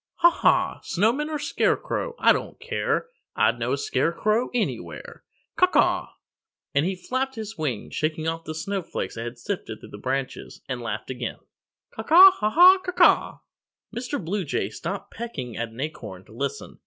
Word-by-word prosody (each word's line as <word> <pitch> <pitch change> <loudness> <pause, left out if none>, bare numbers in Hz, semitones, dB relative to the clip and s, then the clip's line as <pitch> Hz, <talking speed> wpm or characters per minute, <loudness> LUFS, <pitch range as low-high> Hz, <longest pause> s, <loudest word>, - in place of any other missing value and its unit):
"Haw, 345 0 +6
haw! - - +2
Snowman 235 - +1
or 310 - -2
Scarecrow, - - -1
I - - +5
don't - - -5
care; 470 0 -1 0.3
I'd - - +2
know - - -1
a - - 0
Scarecrow 220 - 0
Anywhere, 245 -3 -4 0.3
Caw, 365 - +6
caw!" - - +2 0.7
And 140 +4 +2
he 190 - -1
flapped 260 +8 -3
his 220 -1 -6
wings, 145 - -3
shaking 155 +1 -1
off 165 0 -3
the 155 - -5
snowflakes 185 +2 -4
that 115 0 -5
had 120 +1 -6
sifted 120 - -5
through - - -12
the 105 - -10
branches, 135 +3 -4
and 130 -2 -4
laughed 110 +1 -4
again, 125 -2 -4 0.5
"Caw, - - -6
caw, 355 +11 +9
haw, 215 - -1
haw, 360 - +8
caw, 370 -1 -4
caw!" - - +4 0.6
Mr. 250 +4 -3
Blue 190 +3 -2
Jay 110 - -2
stopped 190 - -6
pecking 140 - -6
at 115 -1 -3
an 115 +2 -14
acorn 115 -11 -6
to - - -19
listen. 135 +5 -5
185 Hz, 175 wpm, -25 LUFS, -, 0.7 s, caw